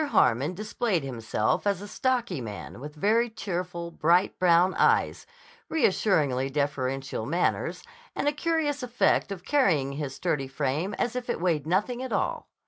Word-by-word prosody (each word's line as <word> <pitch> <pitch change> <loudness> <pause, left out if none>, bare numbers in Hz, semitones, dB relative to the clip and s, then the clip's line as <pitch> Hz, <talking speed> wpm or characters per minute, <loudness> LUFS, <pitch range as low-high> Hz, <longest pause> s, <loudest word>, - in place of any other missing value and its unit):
Harmon 150 - +2
displayed 210 - -1
himself 115 - -1
as 200 -3 +1
a 205 - -8
stocky 240 - -1
man 105 -1 -7
with 150 +3 -8
very 225 +9 +2
cheerful, 180 -5 -4
bright 170 +3 +2
brown 180 +1 +4
eyes, - - +2 0.4
reassuringly 155 - +2
deferential 135 -3 -2
manners, 170 +4 0 0.3
and - - -1
a - - +4
curious 300 -2 0
effect 245 -4 +1
of 180 -2 -6
carrying 175 - +2
his 140 -1 -4
sturdy 150 -6 -1
frame 145 +7 -2
as 240 0 -1
if 250 -1 -4
it - - -1
weighed 165 -4 0
nothing 210 +8 0
at 260 - -5
all. - - -1
175 Hz, 150 wpm, -27 LUFS, 140-220 Hz, 0.4 s, brown